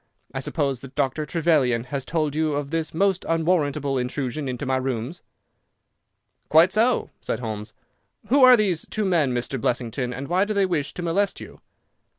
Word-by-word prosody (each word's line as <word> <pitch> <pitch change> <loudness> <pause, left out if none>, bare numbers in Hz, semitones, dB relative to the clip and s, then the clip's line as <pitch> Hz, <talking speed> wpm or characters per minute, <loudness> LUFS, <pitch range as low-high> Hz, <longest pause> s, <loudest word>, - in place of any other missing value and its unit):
I 135 - -3
suppose 140 -2 -1
that 135 +1 -12
Dr. 145 +2 -1
Trevelyan 150 -9 +2
has 135 +1 -5
told 155 -3 -1
you 155 -1 +1
of 145 0 -3
this 165 -1 -1
most 190 +2 +1
unwarrantable 150 -5 +1
intrusion 130 +3 -3
into 125 +2 -4
my 130 0 +1
rooms." 130 +4 -3 1.3
"Quite 165 +4 +6
so," 230 +5 +2
said - - -3
Holmes. 110 -2 -5 0.6
"Who 270 +2 +5
are 255 -1 +9
these 190 -7 0
two 215 -1 -2
men 165 -8 +2
Mr. 125 +1 -2
Blessington, 125 +1 -1
and 135 +2 -6
why 180 +3 +2
do 215 0 -3
they 200 -1 +3
wish 150 -6 -2
to 180 - -5
molest 190 +4 0
you?" - - -12
150 Hz, 170 wpm, -24 LUFS, 130-175 Hz, 1.3 s, are